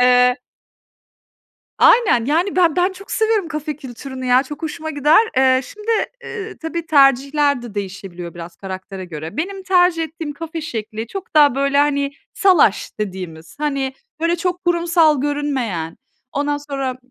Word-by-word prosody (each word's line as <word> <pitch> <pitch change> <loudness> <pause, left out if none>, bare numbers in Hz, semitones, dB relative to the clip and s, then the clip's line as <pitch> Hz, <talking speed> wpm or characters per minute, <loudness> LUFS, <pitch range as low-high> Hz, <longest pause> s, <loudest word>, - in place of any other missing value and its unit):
Eee 250 0 +5 1.4
Aynen, 400 - +5
yani, 335 +8 +1
ben 345 -4 +4
ben 365 +2 +2
çok 390 +1 -12
seviyorum 440 -5 +1
kafe 305 -1 -4
kültürünü, 260 -1 -8
ya, 250 +2 +4
çok 295 +3 -9
hoşuma 315 0 -4
gider. 295 +2 +4 0.2
Eee, 260 0 +4
şimdi, 425 - -5 0.3
ııı, 415 -5 -6
tabii 330 0 -4
tercihler 280 -1 +3
de 235 -4 -9
değişebiliyor 190 -3 -6
biraz 170 0 -9
karaktere 190 0 -7
göre. 160 - -7
Benim 385 +4 -3
tercih 360 -3 +3
ettiğim 320 -2 -6
kafe 325 +2 -6
şekli, 220 -4 -5
çok 385 - -8
daha 290 -4 +6
böyle, 275 0 +1
hani, 280 -1 +2 0.2
salaş 365 - +3
dediğimiz, 180 - -6
hani, 275 -3 -1 0.3
böyle, 335 +1 +1
çok 360 +1 -2
kurumsal 335 -4 +3
görünmeyen, 265 - -2 0.3
ondan 290 +1 -1
sonra, 275 -3 -4
285 Hz, 145 wpm, -19 LUFS, 245-330 Hz, 1.4 s, daha